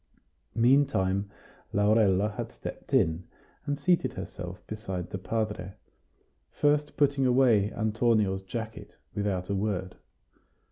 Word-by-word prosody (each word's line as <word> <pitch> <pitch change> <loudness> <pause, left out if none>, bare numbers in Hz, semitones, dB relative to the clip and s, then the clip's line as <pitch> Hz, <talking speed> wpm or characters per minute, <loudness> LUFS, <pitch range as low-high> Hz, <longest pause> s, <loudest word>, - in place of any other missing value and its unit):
Meantime 115 -6 +3 0.4
Laurella 105 -1 +3
had 105 - -5
stepped - - -8
in, 80 +2 +2 0.4
and 145 0 0
seated 170 +5 +2
herself 90 +1 -7
beside 95 -5 -5
the 95 - -4
padre, 105 -2 -3 0.7
first 150 0 +1
putting 140 -2 +3
away 120 -5 +4
Antonio's 110 -3 +1
jacket 110 +3 -7 0.2
without 100 -3 -1
a 100 - -1
word. 95 -2 -2
105 Hz, 105 wpm, -28 LUFS, 95-120 Hz, 0.7 s, away